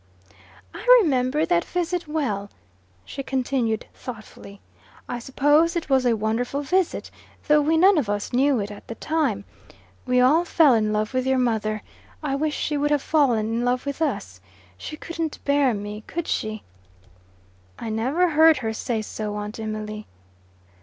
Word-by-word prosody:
"I - - -8 0.2
remember 270 -1 +1
that 170 -1 +2
visit 355 -1 -2
well," 225 -11 -2 0.6
she 275 - -6
continued 255 -4 -1
thoughtfully, 215 -4 -10 0.5
"I 245 - -4
suppose 290 +7 +2
it 330 -4 -3
was 260 -2 +3
a 235 - +3
wonderful 235 +6 -1
visit, 365 +4 0 0.4
though 300 0 +5
we 315 +2 +2
none 375 +1 +6
of 235 -8 -2
us 205 +2 -3
knew 265 0 +3
it 205 0 -4
at 205 - -12
the 230 - -6
time. 275 -12 -1 0.6
We 250 0 +3
all 285 +7 +5
fell 320 -5 +4
in 215 -2 +1
love 215 +3 -1
with 255 0 0
your 265 0 +2
mother. 220 -4 0 0.4
I 285 -3 -1
wish 300 +1 -1
she 295 - -1
would 295 +1 +1
have 295 -2 +1
fallen 260 -9 +2
in 230 +2 -1
love 250 +1 0
with 280 +2 -4
us. 95 - -2 0.3
She 305 - -8
couldn't 330 -1 -4
bear 280 -2 +3
me, 210 0 -5
could 340 -1 -4
she?" 215 0 -2 1.1
"I 225 - -5
never 265 +12 +1
heard 320 0 +6
her 225 -3 -3
say 220 0 -2
so, 210 -1 -5
Aunt 210 +1 -5
Emily." 215 -1 -5
255 Hz, 165 wpm, -24 LUFS, 215-300 Hz, 1.1 s, none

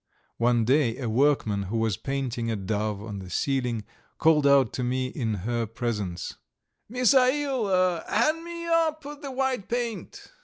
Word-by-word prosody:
One 120 -1 +3
day 130 -2 +2
a 125 - -3
workman, 110 -5 +2
who 115 - -1
was 110 -3 +1
painting 125 -2 -3
a 115 - 0
dove 105 +1 -2
on 105 -2 -6
the 95 -1 -9
ceiling, 125 +1 -1 0.3
called 155 -3 +4
out 140 -5 +4
to 125 - -2
me 130 +1 0
in 115 -6 -2
her 120 -1 -1
presence: 105 -6 -4 0.5
"Misail, 250 - +2
hand 310 +9 +2
me 340 0 -6
up 325 -2 +1 0.2
the 280 - -5
white 260 -5 -1
paint." 240 - -4
135 Hz, 150 wpm, -26 LUFS, -, 0.5 s, called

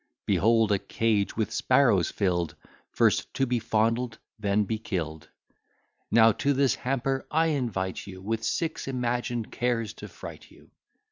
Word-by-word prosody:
Behold 115 0 +3
a 100 - +3
cage 110 -2 0
with 110 -3 0
sparrows - - +3
fill'd, 90 -4 -1 0.3
First - - +2
to 135 - +2
be 125 -1 0
fondled, 115 +1 0 0.2
then 105 0 +2
be 110 +2 -3
kill'd. 80 -8 -4 0.8
Now 115 0 +6
to 140 +7 0
this 135 -1 +3
hamper 135 +1 -2
I 160 +1 +2
invite 110 - -2
you, 95 -1 -9
With 110 +4 -3
six 160 +7 -2
imagined 120 -2 -2
cares 120 -3 -1
to - - -9
fright - - -10
you. - - -20
115 Hz, 145 wpm, -27 LUFS, 100-125 Hz, 0.8 s, Now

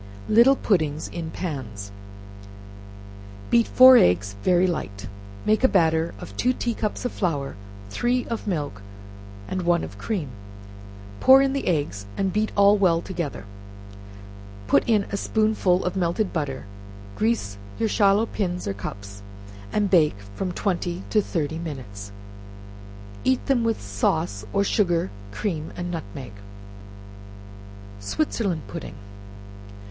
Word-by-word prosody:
Little 235 +5 +6
Puddings 155 - 0
in 165 -2 -5
Pans. 115 - -5 1.6
Beat 235 -1 +4
four 255 0 +9
eggs 100 - +3
very 180 - +3
light; 100 - -3 0.4
make 215 +3 +2
a - - +8
batter 165 -5 +2
of - - -10
two 250 +1 +2
tea 240 -1 -2
cups 215 +2 -3
of 245 - -1
flour, 145 -8 -2 0.4
three 245 - 0
of 230 -2 -5
milk, 145 - -3 0.7
and 185 - -2
one 170 -1 +2
of - - -8
cream; 185 - -3 0.9
pour 265 +1 +8
in 270 0 +1
the 275 - -2
eggs, 145 - -1
and 190 -2 0
beat 215 +1 0
all 200 +1 +6
well 175 -4 +4
together; 170 - -5 1.2
put 135 +7 +4
in 215 -3 +4
a 200 - -1
spoonful 215 -4 +1
of 180 - -1
melted 185 +3 0
butter; 140 - -3 0.5
grease 210 - -1 0.2
your 225 - +1
shallow 205 0 +3
pins 180 -5 -3
or 100 - -1
cups, 100 0 -8 0.5
and 205 -2 0
bake 155 - +4 0.2
from 185 - -3
twenty 180 -1 -2
to 215 - +4
thirty 160 -4 -3
minutes; 120 -11 -7 1.1
eat 260 -1 +1
them 260 -4 +2
with 225 -1 0
sauce, 100 - -1
or 200 - +2
sugar, 175 - +1 0.2
cream 160 - -3
and 175 0 -4
nutmeg. 130 - -7 1.7
Switzerland 185 - -1
Pudding. 155 - -7
175 Hz, 130 wpm, -24 LUFS, 140-210 Hz, 1.7 s, four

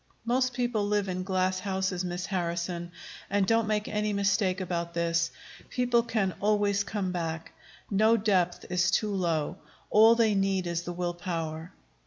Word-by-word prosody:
Most 255 +2 +1
people 240 -4 0
live 205 -1 +1
in 185 0 -2
glass 185 0 0
houses, 190 -1 -1
Miss 180 0 -3
Harrison. 175 -1 -3 0.4
And 200 -1 +2
don't 225 +1 +2
make 210 -1 0
any 210 0 -1
mistake 200 -1 +1
about 170 -2 -3
this: 170 0 +1 0.4
people 245 -1 +2
can 215 -5 -1
always 205 -1 +2
come 200 -3 -3
back. 165 -2 -4 0.4
No 220 +3 +4
depth 185 -5 +1
is 180 +1 +2
too 210 +2 +1
low. 170 -3 -1 0.3
All 225 +2 +7
they 225 -2 +3
need 195 -2 +1
is 170 -1 -1
the 175 0 -5
willpower." 175 -2 -4
190 Hz, 155 wpm, -28 LUFS, 175-210 Hz, 0.4 s, All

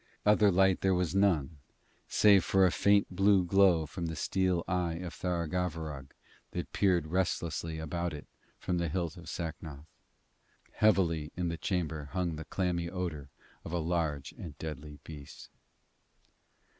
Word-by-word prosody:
Other 105 0 +5
light 95 0 +3
there 95 -1 +3
was 90 -2 0
none, 85 -7 +2 0.5
save 100 -4 +5
for 95 -1 +4
a 90 - +3
faint 100 -1 +2
blue 95 -1 +4
glow 90 -3 +4
from 85 +3 -5
the 80 - -4
steel 90 +1 0
eye 90 -3 0
of 85 -1 -6
Tharagavverug 80 -5 -3 0.4
that - - -5
peered 90 -5 +2
restlessly 85 -1 -1
about 85 +2 -3
it 75 -2 -8 0.3
from 90 -2 -2
the 85 -2 -1
hilt 85 -1 -2
of 85 -2 -10
Sacnoth. 80 -4 -6 0.9
Heavily 85 -7 +2
in 90 -1 -1
the 85 - -2
chamber 80 -5 -2
hung 90 -3 -1
the 80 0 -7
clammy 85 -2 -1
odour 85 -6 -4 0.3
of - - -7
a 85 - 0
large 80 -4 -1
and 75 -5 -8
deadly 75 -1 -7
beast. 75 -3 -11
85 Hz, 145 wpm, -31 LUFS, 80-95 Hz, 0.9 s, Other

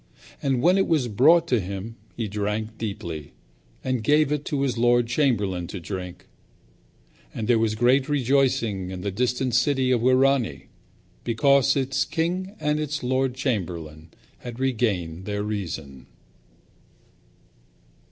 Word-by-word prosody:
And 135 -3 0
when 180 +3 +5
it 195 - +2
was 150 -7 +2
brought 160 +10 +4
to 125 - +3
him 100 +4 -6 0.2
he 115 -2 -2
drank 105 +2 -3
deeply, 90 -9 -5 0.5
and 130 -3 -1
gave 150 +3 +3
it 150 -1 -1
to 140 -2 -2
his 135 -3 0
lord 120 0 +3
chamberlain 110 - 0
to 95 - -6
drink. 90 0 -7 1.1
And 110 - -3
there 120 -2 +4
was 110 -1 +1
great 130 +5 +3
rejoicing 125 -8 +1
in 95 -1 -6
that 100 0 -3
distant 125 +3 0
city 130 +1 +2
of 120 -3 +2
Wirani, 130 - +2 0.5
because 135 +3 +3
its 135 -1 0
king 180 +7 -2
and 150 0 0
its 150 -1 -3
lord 130 0 0
chamberlain 85 - -3 0.3
had 120 0 -8
regained 100 -10 -1
their 105 -1 -2
reason. 80 -11 -5
120 Hz, 135 wpm, -24 LUFS, 100-135 Hz, 1.1 s, when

